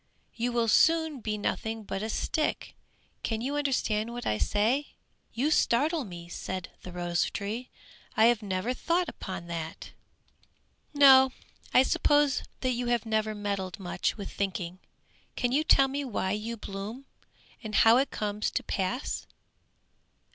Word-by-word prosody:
You 240 +1 -1
will 235 -1 +1
soon 320 +3 +4
be 215 -2 -3
nothing 220 +1 -2
but 195 -1 -4
a 220 - -3
stick! 305 +7 -1 0.5
Can 225 -1 -2
you 270 +5 -2
understand 235 -6 0
what 240 0 -6
I 105 - 0
say?" 235 +8 +1 0.4
"You 275 +6 0
startle 295 +2 +2
me," 175 -3 -9
said 185 +1 -5
the 180 - -9
rose 175 -1 0
tree, 220 +5 -4 0.5
"I 220 - +6
have 235 -1 +4
never 200 +4 -1
thought 340 +6 0
upon 185 -3 -6
that!" 165 -2 -6 1.0
"No, 265 -2 +7 0.4
I 255 - +6
suppose 290 -1 +3 0.2
that 255 - +1
you 245 0 -2
have 240 -1 +1
never 215 -1 0
meddled 200 -3 -3
much 180 +3 -2
with 200 - -6
thinking! 185 -2 -3 0.6
Can 245 - 0
you 290 +4 +2
tell 275 -3 +5
me 280 +2 -3
why 205 -7 -2
you 220 +3 -3
blossom? 210 +6 -7 0.6
And 215 -1 -4
how 225 +3 +7
it 270 +2 +2
comes 210 0 -2
to - - -2
pass? 205 +8 -2
225 Hz, 150 wpm, -29 LUFS, 200-265 Hz, 1.0 s, No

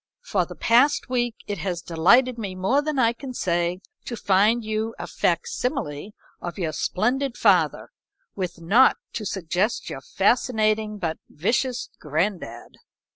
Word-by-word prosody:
For - - 0
the - - -9
past 250 +5 +3
week 240 -2 0
it 205 -3 -4
has 180 -2 -2
delighted 230 +10 +3
me 195 -4 -4
more 195 +10 +2
than 300 -1 -3
I 230 -3 +3
can 255 +1 -8
say 175 -1 0 0.2
to 235 - -5
find 210 +4 +3
you 220 +1 -2
a - - -5
fac 170 -1 0
simile 190 - -3 0.3
of 175 +2 -6
your 170 -5 -1
splendid 245 - -1
father, - - +2 0.4
with 180 -3 -4
naught 210 +11 +5 0.2
to 210 -3 -3
suggest 190 +4 -1
your 135 - -6
fascinating 215 - +1
but 165 -5 -3
vicious 245 - -1
granddad." 155 - -3
210 Hz, 145 wpm, -24 LUFS, 175-240 Hz, 0.4 s, naught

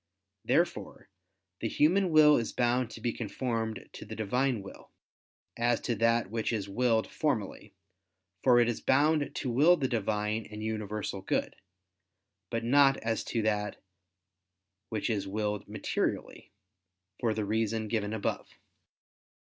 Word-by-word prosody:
Therefore - - -1 0.5
the 115 - -1
human 180 - +3
will 155 -2 +7
is 115 - -2
bound 120 0 +1
to 115 - -10
be 120 0 -1
conformed 115 -1 -3
to - - -8
the 110 +1 -8
Divine 120 +1 0
will, 100 - -12 0.7
as 120 0 +1
to 120 - -1
that 115 -1 +1
which 115 -1 -1
is 105 -4 -2
willed 115 +2 +1
formally, 115 -10 -3 0.7
for 125 -2 +5
it 120 - +4
is 120 - -2
bound 145 +2 +2
to 125 - -2
will 155 +9 +5
the 135 - 0
Divine 105 -2 -1
and 105 0 -7
universal 105 -2 -3
good; - - -1 0.9
but 115 -1 -2
not 135 +3 +5
as 115 0 -2
to 115 -2 -1
that 105 -1 -1 1.1
which 110 -2 -2
is 100 -4 -1
willed 105 +1 -2
materially, - - -3 0.7
for 115 -3 0
the 110 - -1
reason 110 +1 -1
given 105 -1 -1
above. 110 -2 -2
115 Hz, 140 wpm, -30 LUFS, 105-125 Hz, 1.1 s, will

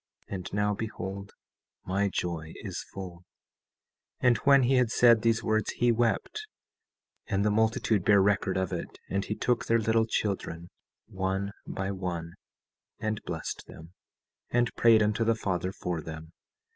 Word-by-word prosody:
And 95 -3 -6
now 105 0 +1
behold, 100 -2 -5 0.5
my 100 +2 +1
joy 85 -3 -3
is 95 -4 -5
full. 90 -3 -8 1.0
17:21 - - +5
And 120 - +3
when 140 +3 +5
he 125 +2 +3
had 125 -2 +3
said 115 -2 +6
these 115 0 +2
words, 110 0 0
he 120 0 +3
wept, 120 - 0 0.8
and 100 0 0
the 105 - +3
multitude 110 -2 +2
bare 100 +1 +5
record 95 -1 +2
of 95 -1 -1
it, - - -5
and 100 0 0
he 105 - -3
took 120 +1 0
their 115 - +4
little 110 0 +2
children, 90 -6 -2 0.4
one 95 +1 -2 0.2
by 95 0 -3
one, 85 -3 -4 0.7
and 110 -1 -2
blessed 80 -2 -5
them, 80 +2 -12 0.6
and 120 0 +1
prayed 115 -2 +5
unto 105 +2 +1
the 115 0 +2
Father 95 -4 -2
for 90 -3 -3
them. 80 +1 -8
100 Hz, 155 wpm, -29 LUFS, 95-115 Hz, 1.0 s, said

